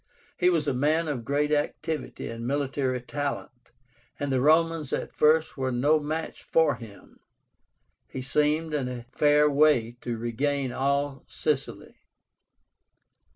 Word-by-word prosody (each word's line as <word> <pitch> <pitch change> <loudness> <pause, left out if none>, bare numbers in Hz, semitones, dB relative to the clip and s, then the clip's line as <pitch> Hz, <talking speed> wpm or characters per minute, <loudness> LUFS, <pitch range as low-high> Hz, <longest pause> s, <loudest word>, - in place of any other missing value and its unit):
He 180 - +3
was 165 -4 +1
a - - +1
man 155 +6 +1
of 135 -6 -3
great 145 +3 0
activity 150 +1 -2
and 115 +1 -5
military 135 -2 -1
talent, 135 -2 -5 0.5
and 145 -1 -2
the 130 -1 +1
Romans 160 0 +3
at - - -3
first 155 +1 +3
were 130 -1 -1
no 145 +6 +3
match 155 +2 -4
for 160 -3 +2
him. 110 -4 -13 0.9
He 130 - -6
seemed 150 +3 +1
in 140 -4 -1
a 125 -2 -6
fair 150 +1 +4
way 140 -5 +3
to 120 -1 -3
regain 130 +4 -1
all 140 +1 -1
Sicily. - - -3
145 Hz, 135 wpm, -27 LUFS, 130-150 Hz, 0.9 s, fair